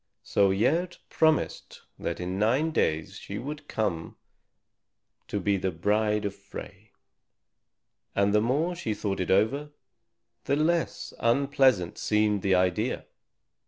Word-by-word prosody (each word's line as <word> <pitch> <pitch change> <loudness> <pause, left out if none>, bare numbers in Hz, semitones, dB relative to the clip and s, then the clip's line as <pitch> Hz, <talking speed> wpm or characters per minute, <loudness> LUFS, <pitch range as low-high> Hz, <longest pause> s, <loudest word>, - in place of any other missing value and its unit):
So 100 -2 +3
Gerd 165 - +1
promised 160 -1 +1 0.2
that - - -3
in 90 +2 -3
nine 130 +10 +2
days 80 - 0
she 100 - -6
would 145 +5 -6
come 85 -7 -2 1.1
to 100 - -2
be 100 +1 +1
the 95 0 -1
bride 105 +5 +1
of 100 - -2
Frey. - - -11 1.3
And 100 0 +2
the 105 - +4
more 145 +10 +1
she 115 -11 -3
thought 100 -2 -2
it 90 - -2
over, 120 +10 +2 0.8
the 140 - +2
less 165 +3 0
unpleasant 130 -6 +2
seemed 105 -1 +2
the 95 -1 +3
idea. 90 +6 0
105 Hz, 125 wpm, -27 LUFS, 95-140 Hz, 1.3 s, the